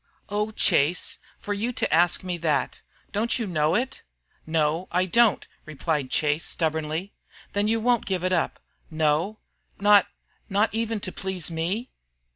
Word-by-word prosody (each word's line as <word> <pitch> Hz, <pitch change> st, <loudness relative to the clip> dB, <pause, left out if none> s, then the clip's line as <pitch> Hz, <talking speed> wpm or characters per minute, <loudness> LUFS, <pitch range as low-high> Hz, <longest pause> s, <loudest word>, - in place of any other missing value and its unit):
"Oh, 210 Hz, +1 st, 0 dB
Chase, 175 Hz, -6 st, +1 dB, 0.2 s
for 205 Hz, -, -4 dB
you 220 Hz, +5 st, -1 dB
to -, -, 0 dB
ask 175 Hz, +3 st, +3 dB
me 180 Hz, -2 st, -3 dB
that! 150 Hz, -5 st, 0 dB, 0.3 s
Don't 220 Hz, +3 st, +1 dB
you 235 Hz, -, -2 dB
know 155 Hz, -4 st, +1 dB
it?" 260 Hz, +2 st, -1 dB, 0.5 s
"No, 160 Hz, +2 st, +1 dB
I 180 Hz, +1 st, +2 dB
don't," 230 Hz, +2 st, +3 dB, 0.2 s
replied 150 Hz, -2 st, -2 dB
Chase, 150 Hz, +3 st, +1 dB
stubbornly. 160 Hz, +3 st, -2 dB, 0.4 s
"Then 205 Hz, +1 st, +1 dB
you 225 Hz, +1 st, +2 dB
won't 240 Hz, -1 st, +1 dB
give 185 Hz, -3 st, -1 dB
it 185 Hz, 0 st, +1 dB
up?" 170 Hz, -, 0 dB, 0.3 s
"No." 160 Hz, +6 st, +1 dB, 0.4 s
"Not 205 Hz, -1 st, +6 dB, 0.4 s
not 205 Hz, +2 st, +2 dB
even 225 Hz, -1 st, -1 dB
to 185 Hz, -, -4 dB
please 185 Hz, -4 st, -3 dB
me?" 180 Hz, +10 st, -2 dB
185 Hz, 150 wpm, -25 LUFS, 160-210 Hz, 0.5 s, Not